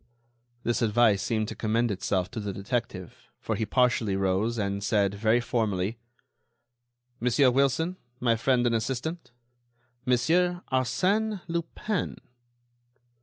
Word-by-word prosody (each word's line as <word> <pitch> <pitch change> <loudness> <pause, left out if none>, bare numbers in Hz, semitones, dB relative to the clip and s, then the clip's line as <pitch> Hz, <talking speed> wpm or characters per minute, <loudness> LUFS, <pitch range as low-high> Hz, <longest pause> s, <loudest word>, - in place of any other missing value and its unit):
This 120 +1 0
advice 110 -3 +3
seemed 110 +1 -1
to - - -6
commend 115 +1 0
itself 95 -1 -1
to 120 - -5
the 105 -1 -3
detective, 100 -2 -4
for - - -2
he 110 - -2
partially 120 -5 +2
rose 95 +4 0
and 100 -1 -2
said, 100 -1 +2
very 110 +3 +2
formally: 110 -3 -1 1.2
"Monsieur 125 +2 +3
Wilson, 140 +7 +1 0.2
my 120 -2 +2
friend 125 +1 +2
and 120 - +2
assistant—Monsieur 125 +5 -2
Arsène 190 - +1
Lupin." 170 +3 -3
120 Hz, 115 wpm, -27 LUFS, 105-130 Hz, 1.2 s, advice